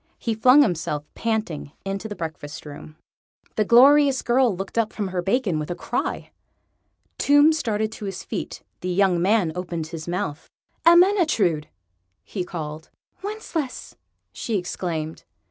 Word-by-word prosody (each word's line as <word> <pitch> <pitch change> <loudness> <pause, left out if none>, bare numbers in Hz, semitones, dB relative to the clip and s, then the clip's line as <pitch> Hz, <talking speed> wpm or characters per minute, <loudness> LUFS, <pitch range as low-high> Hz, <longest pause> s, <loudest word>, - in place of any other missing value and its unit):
He 230 - -2
flung 255 +6 +6
himself, 160 - -1
panting, 215 -11 -3
into 195 +2 -3
the 205 - -6
breakfast 160 -2 -7
room. 150 +1 -10 0.6
The 215 - +2
glorious 270 +4 +6
girl 240 -5 +2
looked 195 +1 -6
up 220 -1 0
from 205 -3 -3
her 185 -1 -2
bacon 195 -3 0
with 150 - -5
a 175 - -2
cry. - - -3 0.9
Tomb 290 +2 +5
started 220 -7 -1
to 215 - -8
his 190 -1 -5
feet. - - -5 0.2
The 185 - -4
young 180 -1 +2
man 195 -3 +2
opened 170 -2 -4
his 165 -2 -7
mouth. 170 -4 -3 0.4
"Ermyntrude!" 335 - +4 0.6
he 190 - -4
called. 160 -3 -7 0.3
"Wencheslaus!" 385 -9 -5 0.4
she 225 -3 -2
exclaimed. 165 -3 -4
195 Hz, 140 wpm, -23 LUFS, 165-245 Hz, 0.9 s, flung